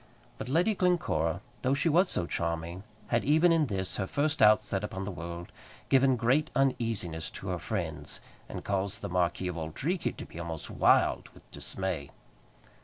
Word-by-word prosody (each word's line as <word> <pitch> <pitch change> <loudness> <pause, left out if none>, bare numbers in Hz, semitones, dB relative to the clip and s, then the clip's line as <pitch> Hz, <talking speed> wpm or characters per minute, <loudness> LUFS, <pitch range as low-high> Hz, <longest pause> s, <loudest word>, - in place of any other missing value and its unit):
But 125 - -5
Lady 175 +10 +3
Glencora, 170 - +1 0.2
though 130 +1 +2
she 145 +4 +1
was 175 +4 +4
so 85 - 0
charming, 85 +1 -2 0.3
had 120 -1 +2
even 160 +5 +5
in 160 -3 +3
this, 95 -4 -2
her 95 - -1
first 150 +5 0
outset 105 -2 +4
upon 95 -2 -4
the 100 - -4
world, 85 0 -7 0.4
given 135 -1 +5
great 130 +7 +2
uneasiness 115 -11 0
to - - -7
her - - -1
friends, - - -3 0.3
and - - -6
caused 100 0 -1
the - - -3
Marquis 90 +1 0
of 85 - -5
Auldreekie 135 - -2
to - - -6
be 85 - -10
almost 80 -2 -5
wild - - +3
with - - -18
dismay. 90 -7 -3
105 Hz, 170 wpm, -30 LUFS, 85-145 Hz, 0.4 s, even